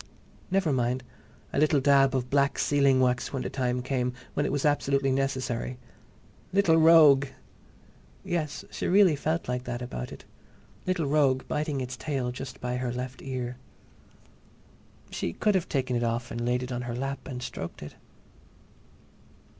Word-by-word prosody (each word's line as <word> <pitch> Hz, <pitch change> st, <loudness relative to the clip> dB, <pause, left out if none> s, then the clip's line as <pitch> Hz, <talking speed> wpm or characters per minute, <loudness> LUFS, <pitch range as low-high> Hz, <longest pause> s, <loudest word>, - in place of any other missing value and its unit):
Never 190 Hz, -5 st, +1 dB
mind—a 125 Hz, +2 st, -4 dB
little 150 Hz, -1 st, +4 dB
dab 135 Hz, -1 st, +4 dB
of 125 Hz, -1 st, -2 dB
black 140 Hz, 0 st, +2 dB
sealing 140 Hz, -2 st, +3 dB
wax 125 Hz, -1 st, +1 dB
when 135 Hz, -2 st, -3 dB
the -, -, -4 dB
time 125 Hz, -2 st, -1 dB
came—when 130 Hz, +2 st, -2 dB
it -, -, -2 dB
was 145 Hz, 0 st, -1 dB
absolutely 140 Hz, -2 st, +2 dB
necessary.... 130 Hz, -2 st, -1 dB, 0.7 s
Little 180 Hz, -4 st, +4 dB
rogue! 155 Hz, -4 st, +7 dB, 1.0 s
Yes, 155 Hz, -4 st, -3 dB
she -, -, -3 dB
really 185 Hz, -3 st, +5 dB
felt 160 Hz, +4 st, -2 dB
like 125 Hz, 0 st, -2 dB
that 120 Hz, -1 st, -3 dB
about 60 Hz, -, -6 dB
it. -, -, -11 dB, 0.6 s
Little 185 Hz, -4 st, 0 dB
rogue 140 Hz, -3 st, +2 dB
biting 150 Hz, -2 st, -1 dB
its 125 Hz, 0 st, -4 dB
tail 130 Hz, -4 st, -2 dB
just 130 Hz, +2 st, -8 dB
by 125 Hz, 0 st, -2 dB
her 125 Hz, -1 st, -2 dB
left 125 Hz, +1 st, -5 dB
ear. 125 Hz, -2 st, -4 dB, 1.5 s
She 85 Hz, -, -3 dB
could 210 Hz, -, +1 dB
have 185 Hz, -3 st, 0 dB
taken 130 Hz, -3 st, -1 dB
it 120 Hz, -, 0 dB
off 120 Hz, +1 st, -2 dB
and 120 Hz, +1 st, -3 dB
laid 125 Hz, +1 st, 0 dB
it 125 Hz, -, -6 dB
on 120 Hz, 0 st, -2 dB
her 120 Hz, -1 st, -4 dB
lap 135 Hz, +1 st, -4 dB
and 125 Hz, -2 st, -6 dB
stroked 80 Hz, -, -6 dB
it. 75 Hz, -, -9 dB
130 Hz, 155 wpm, -27 LUFS, 125-145 Hz, 1.5 s, rogue